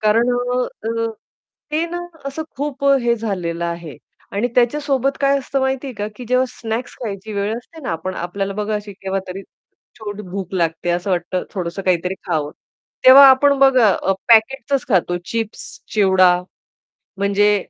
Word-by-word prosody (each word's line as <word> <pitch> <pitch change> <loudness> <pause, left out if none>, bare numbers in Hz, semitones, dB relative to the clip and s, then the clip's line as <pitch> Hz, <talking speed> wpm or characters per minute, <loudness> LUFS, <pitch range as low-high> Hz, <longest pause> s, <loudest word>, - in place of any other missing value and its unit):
कारण 220 +3 +3
अ, 245 +1 0 0.2
अ, 230 0 -1 0.6
ते 310 +2 0
ना 350 - -3 0.3
असं 275 +3 -4
खूप 280 0 -4
अ, 275 0 +5
हे 235 0 +3
झालेलं 180 -6 -3
आहे 170 -5 -5 0.4
आणि 210 +5 0
त्याच्या 245 +4 +3
सोबत 275 -2 0
काय 275 0 +3
असतं 275 +1 -2
माहिती 265 +1 -1
आहे 260 - -6
का 205 0 -3
की 250 - -8
जेव्हा 255 +1 +3
स्नॅक्स 230 +1 -5
खायची 215 -1 -5
वेळ 200 +1 -1
असते 320 +7 -11
ना 175 - -2
पण 185 0 -3
आपल्याला 195 +3 -3
बघा 210 +1 -2
अशी 210 -1 -5
केव्हातरी 190 0 -5 0.6
छोट 210 -1 -6
भूक 195 -1 -5
लागते 165 -1 -1
असं 175 +3 -1
वाटतं 180 +1 -1
थोडंसं 180 0 -4
काहीतरी 180 0 0
खावं. 155 -4 -1 0.5
तेव्हा 270 +2 +11
आपण 280 +2 +5
बघा 260 -4 +6
अ, 195 - 0 0.2
पॅकेट्सचंच 260 +4 +3
खातो 175 -4 +2
चिप्स, 225 0 -5
चिवडा 190 -3 +5 0.8
म्हणजे 200 +1 +3
215 Hz, 165 wpm, -19 LUFS, 190-255 Hz, 0.8 s, तेव्हा